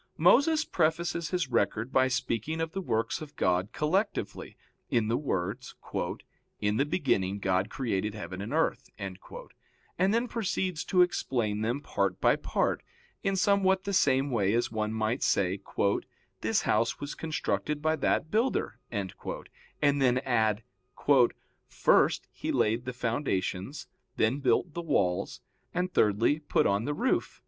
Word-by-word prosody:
Moses 285 - +5
prefaces 170 +1 0
his 180 -2 -1
record 115 +5 0
by 130 0 +4
speaking 130 +4 -2
of 165 0 -2
the 195 - -3
works 115 -7 -1
of 150 -2 -9
God 90 +3 +1
collectively, 190 - -1 0.3
in 110 -2 +1
the 115 - +2
words, 120 -1 -3 0.8
"In 105 +1 0
the 140 - +2
beginning 100 - 0
God 95 0 0
created 105 -5 -2
heaven 90 -2 -6
and 100 - -5
earth," - - 0
and 100 - -5
then 235 +3 +1
proceeds 190 -7 -2
to 180 -2 +5
explain 115 -11 -1
them 120 +6 -1
part 100 -8 -1
by - - +4
part; - - -1 0.4
in 195 0 0
somewhat 190 -1 +3
the 200 - -3
same 135 -5 +3
way 105 -3 +2
as 120 - 0
one 110 -1 -1
might 110 +1 -1
say: 95 0 +1 0.8
"This - - +1
house 115 +2 +1
was 145 0 -5
constructed 155 -1 -2
by 155 +1 +1
that 155 - 0
builder," 230 +5 0
and 100 -5 -5 0.8
then 125 -1 +4
add: 110 -3 +1 1.0
"First, - - +3
he - - -4
laid 115 +3 +1
the 125 - -4
foundations, 120 0 -2 0.3
then 115 +6 +2
built 150 +4 +1
the 170 - -3
walls, 100 - 0 0.3
and 180 0 -1
thirdly, 110 +8 +3
put 150 - +1
on 100 +3 +1
the 145 +1 -1
roof." 255 - 0
130 Hz, 145 wpm, -29 LUFS, 105-165 Hz, 1.0 s, Moses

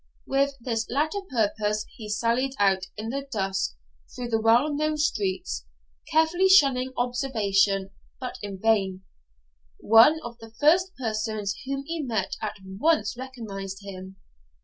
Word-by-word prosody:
With 275 +1 +1
this 230 -2 -2
latter 310 - 0
purpose 215 -2 0
he 215 -2 -8
sallied 235 +5 0
out 190 -2 +2
in 220 +2 -4
the 275 +3 -2
dusk 195 - -1 0.4
through 245 -1 -5
the 225 -1 +1
well 240 +7 +4
known 305 +1 0
streets, 195 - -1 0.4
carefully 330 +4 +3
shunning 270 -8 +5
observation, 205 -6 +1 0.3
but 255 -1 -6
in 200 -2 -6
vain: 195 -3 +1 0.8
one 230 +9 +6
of 240 0 -8
the 225 0 -13
first 360 +5 +4
persons 215 -4 -2
whom 275 0 -2
he 330 +1 -3
met 225 -8 -2
at - - -3
once 210 +4 +1
recognised 210 -7 -7
him. 190 -1 -9
225 Hz, 135 wpm, -26 LUFS, 200-275 Hz, 0.8 s, one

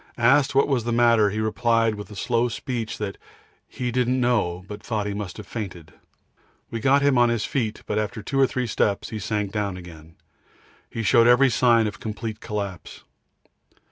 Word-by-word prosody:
Asked 135 +4 +3
what 140 - +4
was 135 -5 0
the 120 - -2
matter, 115 -3 +4
he 105 +2 -3
replied 115 +1 +1
with 105 0 -8
a 105 - -10
slow 120 +3 +1
speech 115 0 -4
that 105 -2 -5 0.5
he 125 -1 -4
didn't 125 +1 +1
know, 105 -8 0
but 105 0 -8
thought 105 -3 -2
he 105 - -2
must 100 -3 -6
have 105 - -8
fainted. 90 -7 -7 0.8
We 115 - -3
got 135 +5 +3
him 140 -3 +4
on 120 0 +5
his 115 -3 0
feet, 110 -6 -2
but 105 - -1
after 105 0 -4
two 135 - -2
or 135 - +5
three 125 0 -2
steps 105 -2 0
he 110 - -4
sank 105 -1 -2
down 100 -3 -2
again. 80 -2 -12 0.7
He 115 - -4
showed 115 +2 +5
every 125 +2 +5
sign 115 -2 +4
of 105 - -4
complete 110 0 -5
collapse. 100 -5 -6
110 Hz, 190 wpm, -24 LUFS, 105-120 Hz, 0.8 s, on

